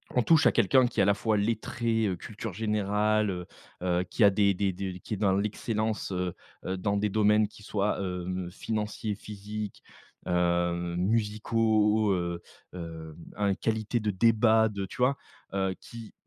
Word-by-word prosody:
on 125 - +4
touche 160 -2 +5
à - - +6
quelqu'un 130 -2 +4
qui 120 - -4
est - - +6
à 100 - +3
la 100 - +5
fois 110 +1 0
lettré, 115 +1 0
heu, 90 - -2
culture 110 +4 -6
générale 105 +1 +1
heu 90 -1 -5 0.4
heu, 90 0 +1
qui 100 +5 0
a - - +8
des 100 0 +3
des 95 0 0
des 95 -1 -5
qui 110 - -6
est - - -7
dans 95 -1 +2
l'excellence, 110 +1 -2
heu 90 -1 -2 0.3
heu, 95 - -1
dans 100 +2 0
des 105 +1 +1
domaines 105 0 +3
qui 105 - -16
soient, 100 0 -1
heu, 90 -1 -3
financiers, 105 +1 -3
physiques, 105 0 -7 0.5
heu, 85 0 +1
musicaux, 110 +1 +2
heu, 85 -1 -2 0.3
hem 80 -3 -7 0.2
un 100 -2 +1
qualité 110 +1 -1
de 105 -1 0
débats, 110 +2 +4
de 100 -2 -4
tu 95 - -11
vois? 125 +3 +3 0.4
Heu, 95 -1 0
qui 115 -2 -10
105 Hz, 175 wpm, -28 LUFS, 95-110 Hz, 0.5 s, a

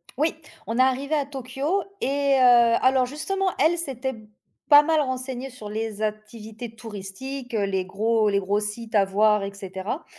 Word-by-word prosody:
Oui, 310 +4 0 0.3
on 225 +3 -3
est - - +7
arrivées 270 +4 +1
à 285 - 0
Tokyo 275 +7 -2 0.2
et 280 0 +2
heu - - +3 0.4
alors 260 -1 +4
justement, 380 +8 -2
elle, 325 +4 +3
s'était 265 -5 -3 0.5
pas 290 -1 +10
mal 315 0 +2
renseignée 260 -1 -4
sur 220 -4 -9
les 215 0 -4
activités 215 +1 -6
touristiques, 230 +4 -7
heu, 205 -2 +1
les 190 -1 -1
gros 215 +3 +1
les 200 -1 +2
gros 200 +2 0
sites 220 +2 -5
à 200 -2 +5
voir, 210 +1 +3
et 200 0 -5
cetera 195 - -6
240 Hz, 170 wpm, -24 LUFS, 210-275 Hz, 0.5 s, pas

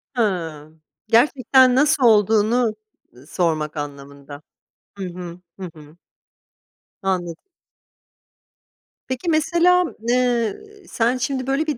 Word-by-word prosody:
Hıı, 165 -9 -2 0.4
gerçekten 255 +1 +4
nasıl 295 0 +2
olduğunu, 220 +1 +3 0.4
ııı, 130 +4 -18
sormak 160 -4 -2
anlamında. 140 0 -8 0.6
Hı 195 - -5
hı, 175 0 -9 0.2
hı 185 -2 -6
hı. 150 +1 -15 1.1
Anladım. 175 -3 -2 1.7
Peki 260 +7 -3
mesela, 340 +3 +3 0.3
ııı, 245 -4 0 0.3
sen 240 +2 0
şimdi 260 +1 -3
böyle 285 +4 0
bir 295 - -2
220 Hz, 95 wpm, -21 LUFS, 165-260 Hz, 1.7 s, gerçekten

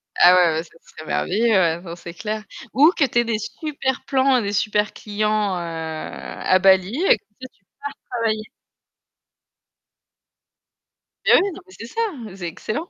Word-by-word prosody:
Ah 180 +1 +7
ouais, 175 -3 +4
ouais, 160 - -1
ça 165 - -19
serait 155 - -13
merveilleux, 225 +9 +1
ouais 175 -6 +4
enfin, 170 -1 -8
c'est 170 0 -10
clair. 215 +4 -4 0.3
Ou 300 +5 +6
que 290 - +4
tu 240 -1 +1
aies - - +3
des 230 -2 0
super 265 +1 -3
plans 265 -1 +3
et - - +1
des 205 -1 -3
super 210 0 0
clients, 210 -2 -1
heu, - - -3
à 165 +2 -2
Bali 190 +2 +4
et - - +6
comme - - -35
ça 260 - -6
tu - - -36 0.4
pars 245 - -7
travailler. 215 -1 0 2.8
Eh - - +6
oui, - - +6
non 380 - -10
mais 375 - -16
c'est - - -8
ça, 455 - -3 0.3
c'est 180 -3 -5
excellent. 220 - -5
210 Hz, 175 wpm, -22 LUFS, 180-240 Hz, 2.8 s, Ah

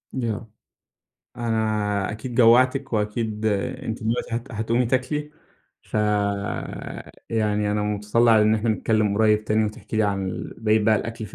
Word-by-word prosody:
آه، 115 -3 -3 0.9
أنا 110 -4 0
أكيد 120 +3 -6
جوعتِك، 130 +3 +4
وأكيد 105 0 -1
أنتِ 110 +3 -2
دلوقتي 115 +1 -1
هت 120 +3 -7
هتقومي 115 +3 0
تاكلي، 130 +5 -1 0.5
فيعني 105 +1 -2
أنا 105 0 0
متطلع 105 +2 +3
إن 105 +1 +4
إحنا 110 +1 0
نتكلم 110 -1 +1
قريب 110 -1 +3
تاني 110 0 +2
وتحكي 105 +1 -5
لي 110 - +3
عن 100 -2 0
ال - - -6
بقية 110 -1 +3
بقي 110 0 +4
الأكل 115 +1 -5
في 105 - -14
110 Hz, 140 wpm, -23 LUFS, 105-115 Hz, 0.9 s, جوعتِك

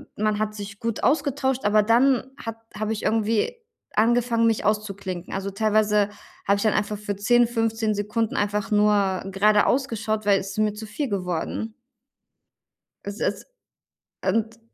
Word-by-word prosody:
man 215 0 0
hat 215 0 -1
sich 200 -1 -8
gut 230 -1 -3
ausgetauscht, 270 -4 +1
aber 210 +1 +5
dann 255 +3 +3
hat 225 -1 -6 0.2
habe 215 +1 -1
ich 215 - -5
irgendwie 225 - +1 0.4
angefangen, 230 +1 +3
mich 225 -1 +1
auszuklinken. 200 -4 -2
Also, 195 +1 -3
teilweise 210 0 +2 0.4
habe 200 - +4
ich 200 - -3
dann 215 - +3
einfach 210 0 -1
für 205 0 -4
10, 240 +4 +3
15 225 -2 0
Sekunden 210 +2 -1
einfach 210 +2 -1
nur 205 -3 +2
geradeaus 210 +7 +3
geschaut, 215 -2 -3
weil 200 -1 +5
ist 195 +2 -7
mir 215 -1 +2
zu 220 +1 -8
viel 260 +6 -3
geworden. 185 +3 -3 1.3
Es 200 +1 -6
ist - - -2 0.8
und 225 +3 0
215 Hz, 150 wpm, -24 LUFS, 205-225 Hz, 1.3 s, aber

